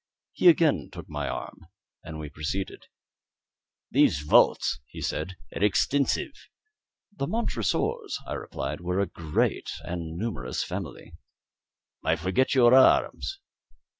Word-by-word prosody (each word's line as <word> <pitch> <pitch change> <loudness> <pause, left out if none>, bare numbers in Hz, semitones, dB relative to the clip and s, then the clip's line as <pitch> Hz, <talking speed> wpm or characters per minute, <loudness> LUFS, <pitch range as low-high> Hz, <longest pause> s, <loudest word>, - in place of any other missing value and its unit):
He - - +2
again 165 -2 +3
took 85 -2 -9
my 75 -3 -3
arm, 85 - -7 0.4
and 80 -2 -7
we 75 -1 -6
proceeded. 80 +7 -4 1.0
"These 70 - +3
vaults," 75 -1 +4
he - - -10
said, 95 - -3 0.2
"are - - -1
extensive." 135 +7 +2 0.8
"The 140 - -2
Montresors," 140 - -1
I - - -5
replied, 70 +4 -5
"were 90 +2 -1
a 100 - +2
great 80 -3 -1
and 85 -2 -5
numerous 85 - -3
family." - - -7 0.9
"I 80 - +2
forget 95 - +1
your 120 -2 +6
arms." 135 - +4
90 Hz, 120 wpm, -27 LUFS, 80-125 Hz, 1.0 s, your